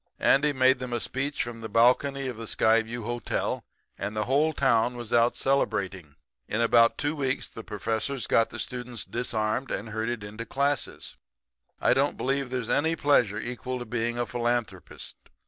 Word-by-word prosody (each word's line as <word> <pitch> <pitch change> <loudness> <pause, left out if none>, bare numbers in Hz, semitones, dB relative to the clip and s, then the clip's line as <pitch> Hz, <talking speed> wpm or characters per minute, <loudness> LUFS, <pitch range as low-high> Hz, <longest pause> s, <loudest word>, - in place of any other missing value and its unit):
Andy 145 +2 +4
made 130 -1 +4
them 125 -1 -4
a 120 - 0
speech 140 +5 -2
from 120 -1 -7
the 110 - -5
balcony 130 +5 +3
of 125 - -4
the 115 0 -7
Skyview 115 +2 +2
Hotel, 120 +2 -2 0.4
and 100 +2 -3
the 105 - 0
whole 145 +5 +3
town 125 -4 +2
was 120 -2 -6
out 120 0 +4
celebrating. 95 - 0 0.3
"In 105 - -1
about 115 0 +5
two 145 +2 -1
weeks 135 -3 -1
the 115 - -9
professors 110 +5 -2
got 115 - +3
the - - -7
students 125 -1 -4
disarmed 115 +1 -1
and 105 +3 -3
herded 110 0 -2
into 105 +3 -6
classes. 140 +1 -1 0.6
I - - +4
don't - - +1
believe 135 0 -1
there's 125 -3 -3
any 160 +6 +2
pleasure 125 -9 +3
equal 125 +3 -4
to 120 - -6
being 120 +1 -2
a 120 - 0
philanthropist. 120 -1 -3
120 Hz, 170 wpm, -27 LUFS, 115-135 Hz, 0.6 s, about